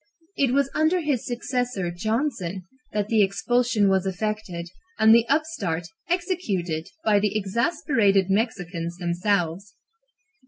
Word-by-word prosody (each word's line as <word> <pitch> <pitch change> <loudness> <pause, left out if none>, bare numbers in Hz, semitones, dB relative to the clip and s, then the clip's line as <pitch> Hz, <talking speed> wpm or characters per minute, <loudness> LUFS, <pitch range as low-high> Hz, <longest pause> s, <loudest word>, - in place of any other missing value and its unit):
It 275 -3 +2
was 275 0 +2
under 315 +4 +2
his 290 -6 -1
successor, 245 -6 -2
Johnson, 210 - -2 0.3
that 210 -1 -1
the 220 -1 +3
expulsion 230 +2 +2
was 190 0 +2
effected 190 -3 -3 0.3
and 220 0 +6
the 235 0 +5
upstart 265 - 0 0.2
executed 205 - -1 0.2
by 210 -2 +4
the 210 +1 0
exasperated 215 - +2
Mexicans 180 -5 -2
themselves. 180 +1 -1
210 Hz, 115 wpm, -24 LUFS, 185-250 Hz, 0.3 s, and